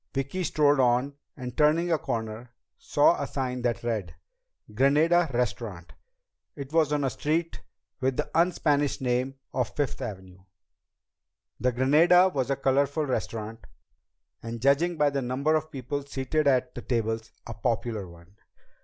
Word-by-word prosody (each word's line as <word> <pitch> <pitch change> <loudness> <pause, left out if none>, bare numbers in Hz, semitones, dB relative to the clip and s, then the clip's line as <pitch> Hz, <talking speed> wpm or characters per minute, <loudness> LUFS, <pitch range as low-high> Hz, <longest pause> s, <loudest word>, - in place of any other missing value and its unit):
Vicki 140 +7 -2
strolled 145 -3 +3
on, 125 +2 +2 0.2
and 125 -1 -6
turning 160 +3 +3
a 160 - +2
corner, 110 +1 -4 0.3
saw - - +3
a - - -2
sign 125 -2 -3
that 120 -1 -1
read: 105 -8 -3 0.6
GRANADA 155 +7 +3
RESTAURANT. 105 -7 -3 0.6
It 140 0 -8
was 160 -3 +3
on 145 -1 +1
a 135 - +1
street 165 +3 -2 0.4
with 130 -1 0
the - - -1
un 170 +3 +4
Spanish 145 -4 0
name 130 +1 -1 0.2
of 125 -3 -2
Fifth 145 -3 -2
Avenue. 95 -4 -7 1.2
The 125 - +1
Granada 160 +9 +5
was 135 -7 -2
a 140 - +2
colorful 140 +3 +1
restaurant, 115 -4 -4 0.7
and 115 0 -6
judging 145 +7 +2
by 145 -1 +3
the 140 -1 -1
number 130 +5 0
of 155 0 0
people 140 +1 -4
seated 140 +2 -1
at 130 -2 +2
the - - -7
tables, 115 -2 -2
a 115 - -6
popular 115 -5 -2
one. 85 +4 -17
130 Hz, 150 wpm, -27 LUFS, 120-150 Hz, 1.2 s, Granada